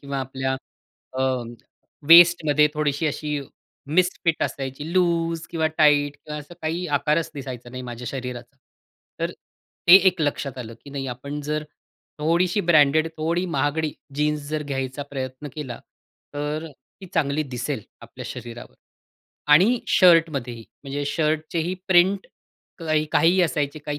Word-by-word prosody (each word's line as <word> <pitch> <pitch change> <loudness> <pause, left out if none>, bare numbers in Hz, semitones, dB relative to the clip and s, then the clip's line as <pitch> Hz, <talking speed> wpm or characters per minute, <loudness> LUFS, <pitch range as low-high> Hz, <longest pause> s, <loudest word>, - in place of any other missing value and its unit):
किंवा 140 -1 -4
आपल्या 130 0 -2 0.6
अ, - - +1 0.9
वेस्टमध्ये 165 -3 +7
थोडीशी 150 +1 0
अशी 150 0 -2 0.6
मिसफिट 180 -2 +2
असायची. 135 +1 -4
लूज 170 -2 +1
किंवा 160 -2 0
टाईट 145 -1 +4
किंवा 150 +1 -7
असं 150 +4 -13
काही 165 +3 -2
आकारच 155 +3 0
दिसायचा 130 -3 -7
नाही 125 0 -7
माझ्या 120 0 -7
शरीराचा. 125 -1 -7 0.6
तर - - 0 0.6
ते 175 - +11
एक 180 -2 -3
लक्षात 140 -3 -2
आलं, 115 -2 -7
की 140 - -11
नाही 140 -1 -4
आपण 140 +4 -5
जर 150 +1 -3 0.5
थोडीशी 170 +5 +1
ब्रँडेड, 155 0 +5
थोडी 165 +3 0
महागडी 150 -1 -1 0.2
जीन्स 150 +1 0
जर 155 0 -2
घ्यायचा 135 -1 -4
प्रयत्न 130 +1 -5
केला, 130 -6 -6 0.6
तर 150 +2 -3 0.3
ती 190 - -9
चांगली 150 -2 +1
दिसेल 125 +1 -3 0.2
आपल्या - - -10
शरीरावर. 120 -1 -9 0.8
आणि 210 +11 +5
शर्टमध्येही, 155 -10 +3 0.2
म्हणजे 140 +1 -3
शर्टचेही 160 +3 -1
प्रिंट 190 +2 +4 0.5
काही 155 -2 0
काहीही 170 +4 +4
असायचे. 150 -3 -1
काही 145 -1 -5
150 Hz, 130 wpm, -23 LUFS, 135-165 Hz, 0.9 s, ते